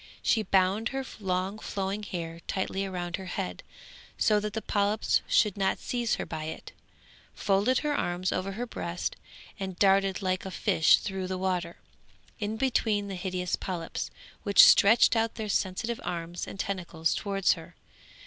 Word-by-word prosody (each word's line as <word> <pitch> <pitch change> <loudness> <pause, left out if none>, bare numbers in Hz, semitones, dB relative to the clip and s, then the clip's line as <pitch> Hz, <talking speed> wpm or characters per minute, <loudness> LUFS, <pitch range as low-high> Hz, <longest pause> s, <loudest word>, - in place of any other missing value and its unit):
She 225 - +3
bound 195 +3 +2
her 270 0 -3
long 190 +1 -1
flowing 195 0 -3
hair 170 -4 -5
tightly 195 0 -2
round 175 -2 -3
her 190 - -8
head, 90 - -4 0.6
so 210 -1 +3
that 210 0 -4
the 220 - -2
polyps 205 +1 +1
should 210 -4 +3
not 195 -1 +1
seize 240 -2 -1
her - - -4
by 155 -1 -5
it, 160 - -7 0.6
folded 205 +6 +2
her 295 -1 +1
hands 175 -5 -1
over 195 +1 -2
her 235 +5 -3
breast, 180 -6 -4 0.4
and 190 -2 -4
darted 195 0 +3
like 185 0 0
a 190 - -5
fish 160 -3 +4
through 190 -2 -4
the 185 0 -3
water, 180 -2 -2 0.6
in 215 0 -2
between 220 -5 +1
the 195 - -4
hideous 180 -1 -2
polyps, 170 -3 -4 0.3
which 200 -1 +7
stretched 225 +4 +6
out 225 0 +1
their 220 -2 -4
sensitive 210 +4 -1
arms 170 0 -4
and 195 - -9
tentacles 175 -5 -1
towards 195 -2 +1
her. - - -11
195 Hz, 160 wpm, -28 LUFS, 180-210 Hz, 0.6 s, which